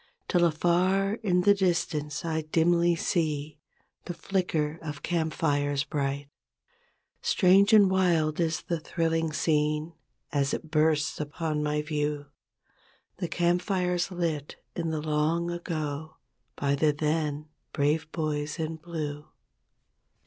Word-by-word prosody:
Till 175 Hz, -2 st, +2 dB
afar 185 Hz, +5 st, +2 dB
in 180 Hz, -5 st, +2 dB
the 205 Hz, +2 st, +6 dB
distance 170 Hz, -5 st, -1 dB
I 160 Hz, -1 st, -1 dB
dimly 170 Hz, +2 st, +2 dB
see 155 Hz, -4 st, -1 dB, 0.5 s
The 175 Hz, -, -5 dB
flicker 165 Hz, -4 st, -1 dB
of 150 Hz, -2 st, -7 dB
camp 165 Hz, -2 st, 0 dB
fires 145 Hz, -2 st, 0 dB
bright. 140 Hz, -1 st, -2 dB, 0.9 s
Strange 200 Hz, -, +4 dB
and 210 Hz, -3 st, +7 dB
wild 175 Hz, -5 st, +2 dB
is 165 Hz, -1 st, 0 dB
the 170 Hz, -2 st, -2 dB
thrilling 165 Hz, 0 st, -1 dB
scene 155 Hz, +1 st, 0 dB, 0.4 s
As 140 Hz, -3 st, +1 dB
it 160 Hz, -, -9 dB
bursts 155 Hz, -1 st, +2 dB
upon 150 Hz, +1 st, -2 dB
my 150 Hz, 0 st, 0 dB
view— 150 Hz, -1 st, -2 dB, 0.9 s
The 175 Hz, -1 st, -2 dB
camp 175 Hz, +1 st, +1 dB
fires 180 Hz, -2 st, 0 dB
lit 165 Hz, -5 st, -3 dB, 0.2 s
in 165 Hz, -2 st, -2 dB
the 155 Hz, -1 st, -2 dB
long 155 Hz, +3 st, 0 dB
ago 155 Hz, -3 st, -4 dB, 0.4 s
By 140 Hz, -1 st, 0 dB
the 150 Hz, +2 st, +3 dB
then 150 Hz, 0 st, -1 dB, 0.2 s
"Brave 155 Hz, +2 st, 0 dB
Boys 155 Hz, -1 st, -2 dB
in 160 Hz, -1 st, -3 dB
Blue". 155 Hz, -3 st, -5 dB
160 Hz, 125 wpm, -28 LUFS, 150-175 Hz, 0.9 s, and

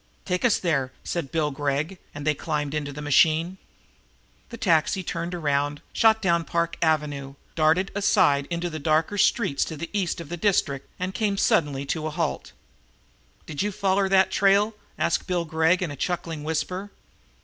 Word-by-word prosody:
"Take 180 Hz, -1 st, -1 dB
us 240 Hz, -3 st, +4 dB
there," 140 Hz, -8 st, 0 dB
said 170 Hz, -6 st, -3 dB
Bill 155 Hz, -3 st, 0 dB
Gregg, 145 Hz, +6 st, -2 dB, 0.2 s
and 145 Hz, 0 st, -6 dB
they 155 Hz, -, +3 dB
climbed 150 Hz, 0 st, -3 dB
into 145 Hz, -1 st, -2 dB
the 150 Hz, +1 st, -7 dB
machine. 160 Hz, +5 st, +3 dB, 0.9 s
The 230 Hz, -, -8 dB
taxi 185 Hz, -3 st, +2 dB
turned 170 Hz, +1 st, -4 dB
around, 145 Hz, -2 st, 0 dB
shot 220 Hz, -1 st, +4 dB
down 170 Hz, -2 st, +2 dB
Park 170 Hz, 0 st, -1 dB
Avenue, 145 Hz, -4 st, 0 dB, 0.2 s
darted 165 Hz, +5 st, +2 dB
aside 145 Hz, -8 st, +3 dB
into 170 Hz, 0 st, -2 dB
the 155 Hz, -2 st, -5 dB
darker 160 Hz, +6 st, +1 dB
streets 190 Hz, -, +2 dB
to 160 Hz, -, -7 dB
the 170 Hz, -, -6 dB
east 190 Hz, -3 st, -1 dB
of 170 Hz, -, -8 dB
the 175 Hz, -, -4 dB
district 160 Hz, -7 st, 0 dB
and 185 Hz, +1 st, -3 dB
came 205 Hz, -2 st, 0 dB
suddenly 140 Hz, -7 st, +1 dB
to 155 Hz, +2 st, -2 dB
a -, -, -2 dB
halt. 150 Hz, -, -3 dB, 0.9 s
"Did 150 Hz, -3 st, -4 dB
you 205 Hz, +1 st, 0 dB
foller 195 Hz, 0 st, +1 dB
that 190 Hz, -1 st, +4 dB
trail?" 200 Hz, +2 st, +3 dB, 0.2 s
asked -, -, 0 dB
Bill 175 Hz, -2 st, 0 dB
Gregg 160 Hz, +3 st, +2 dB
in 165 Hz, -, -3 dB
a -, -, -6 dB
chuckling 165 Hz, 0 st, -3 dB
whisper. 180 Hz, +5 st, -3 dB
165 Hz, 170 wpm, -25 LUFS, 150-190 Hz, 0.9 s, us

